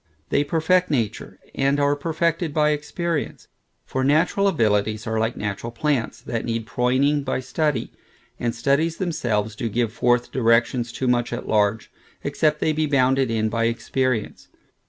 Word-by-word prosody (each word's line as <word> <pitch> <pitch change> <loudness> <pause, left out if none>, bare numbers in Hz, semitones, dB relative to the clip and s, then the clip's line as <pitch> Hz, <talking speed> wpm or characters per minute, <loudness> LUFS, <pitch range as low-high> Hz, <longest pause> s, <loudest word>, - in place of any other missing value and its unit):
They 145 - +2
perfect 165 +5 +2
nature, 120 -8 -2 0.2
and 140 +1 +1
are 145 0 +3
perfected 165 +1 -1
by 150 -1 +3
experience: 150 +2 -3 0.4
for 130 - -2
natural 165 +8 +3
abilities 110 - +1
are 110 0 -1
like 110 +2 -1
natural 105 +2 -4
plants, 125 0 -1
that 115 -2 -3
need 115 -1 -2
proyning, 130 +5 +1
by 130 - -1
study; 135 -1 -1 0.5
and 120 0 -1
studies 140 +7 +1
themselves, 115 - -1
do 115 +1 -3
give 115 0 -1
forth 120 0 +1
directions 120 0 +2
too 130 +2 -3
much 120 -1 +1
at 120 - -5
large, 105 0 +1 0.3
except 150 -1 0
they 155 - +2
be 155 0 0
bounded 135 -2 +2
in 110 -1 0
by 115 +1 0
experience. 115 0 -1
130 Hz, 155 wpm, -23 LUFS, 115-150 Hz, 0.5 s, are